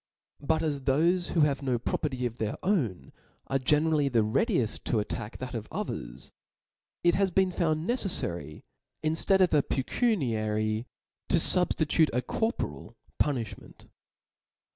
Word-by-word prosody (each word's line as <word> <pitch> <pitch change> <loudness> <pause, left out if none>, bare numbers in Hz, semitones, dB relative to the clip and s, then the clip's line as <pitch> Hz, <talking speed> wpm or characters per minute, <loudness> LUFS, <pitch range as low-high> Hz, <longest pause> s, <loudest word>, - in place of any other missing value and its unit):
But 160 +2 +1
as 150 -3 -1
thofe 165 +7 +1
who 165 - +3
have 145 -2 +2
no 130 -3 0
property 125 +1 -2
of 120 0 -4
their 110 -1 -1
own 120 - 0 0.3
are 135 - 0
generally 150 +1 +3
the 115 -4 +3
readied 125 - +1 0.2
to 115 - +1
attack 105 +1 -4
that 130 0 -6
of 110 -2 -5
others,. - - -5 0.7
it 175 0 +5
has 195 +3 +2
been 185 +1 +2
found 160 -1 0
neceffary, 85 - -2 0.4
inftead 165 +5 +2
of 180 - +4
a 150 - +5
pecuniary, 115 - 0 0.4
to - - +4
fubftitute 160 -3 +3
a 125 +1 0
corporal 225 - -3 0.3
puniihment. 125 -8 -3
140 Hz, 135 wpm, -28 LUFS, 115-170 Hz, 0.7 s, it